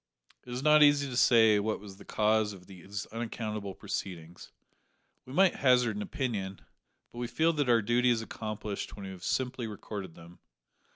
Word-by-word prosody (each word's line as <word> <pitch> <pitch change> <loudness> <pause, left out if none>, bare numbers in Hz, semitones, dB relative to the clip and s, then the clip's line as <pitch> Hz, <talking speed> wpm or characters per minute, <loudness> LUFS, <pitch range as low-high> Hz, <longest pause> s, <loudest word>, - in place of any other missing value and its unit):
It - - -8
is 125 +2 -4
not 150 0 +6
easy 145 -1 +5
to 125 - -5
say 110 -3 +5
what 110 +1 -1
was 100 -1 -11
the - - -14
cause 110 -1 +1
of 90 -2 -13
these 95 +2 -7
unaccountable 110 -3 -4
proceedings. 90 -4 -6 0.8
We 130 - -9
might 190 +3 +4
hazard 125 -4 +3
an 105 - -4
opinion, 105 -8 -3 0.5
but 120 - -8
we 120 - -2
feel 160 +6 +2
that 145 -4 0
our 115 -2 +4
duty 120 +3 +2
is 115 -2 +1
accomplished 110 -2 -5
when 100 - -8
we 95 - -6
have 95 -2 -11
simply 125 -2 -1
recorded 100 -4 -7
them. 85 +1 -14
110 Hz, 180 wpm, -30 LUFS, 100-125 Hz, 0.8 s, not